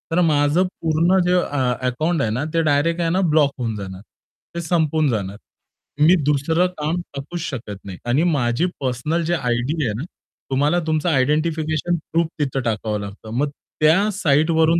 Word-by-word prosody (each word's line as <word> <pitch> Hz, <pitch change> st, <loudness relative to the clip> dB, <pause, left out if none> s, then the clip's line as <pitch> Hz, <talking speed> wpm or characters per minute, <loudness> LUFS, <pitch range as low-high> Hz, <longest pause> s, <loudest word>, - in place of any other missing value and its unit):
तर 180 Hz, -, +4 dB
माझं 145 Hz, +3 st, +3 dB, 0.2 s
पूर्ण 165 Hz, +4 st, +3 dB
जे 180 Hz, -, +3 dB
अ 130 Hz, -6 st, 0 dB
अकाउंट 155 Hz, +5 st, 0 dB
आहे 110 Hz, -, +1 dB
ना, 125 Hz, +6 st, -1 dB
ते 165 Hz, -, +3 dB
डायरेक्ट 155 Hz, +3 st, +2 dB
आहे 165 Hz, -, +1 dB
ना, 185 Hz, +3 st, +1 dB
ब्लॉक 145 Hz, -3 st, +4 dB
होऊन 115 Hz, -3 st, -2 dB
जाणार. 95 Hz, -2 st, -7 dB, 0.5 s
ते 170 Hz, -, -2 dB
संपून 160 Hz, -3 st, +1 dB
जाणार. 100 Hz, -3 st, -2 dB, 0.6 s
मी 170 Hz, +5 st, +7 dB
दुसरं 155 Hz, +5 st, +2 dB
काम 155 Hz, +3 st, -1 dB, 0.2 s
टाकूच 140 Hz, +6 st, -5 dB
शकत 115 Hz, -, -5 dB
नाही 95 Hz, -2 st, -7 dB
आणि 135 Hz, +7 st, +2 dB
माझी 140 Hz, -2 st, +1 dB
पर्सनल 140 Hz, +6 st, -1 dB
जे 170 Hz, -, 0 dB
आयडी 130 Hz, +3 st, -1 dB
आहे 105 Hz, -, -1 dB
ना, -, -, -3 dB, 0.5 s
तुम्हाला 145 Hz, +6 st, +2 dB
तुमचं 155 Hz, +2 st, +1 dB
आयडेंटिफिकेशन 155 Hz, +3 st, +1 dB, 0.2 s
प्रूफ 165 Hz, 0 st, +2 dB
तिथं 135 Hz, -2 st, -1 dB
टाकावं 110 Hz, -2 st, -1 dB
लागतं. 100 Hz, +2 st, -9 dB
मग 145 Hz, +1 st, +1 dB, 0.3 s
त्या 185 Hz, +7 st, +4 dB
साइटवरून 160 Hz, -1 st, +3 dB
150 Hz, 165 wpm, -21 LUFS, 125-165 Hz, 0.6 s, मी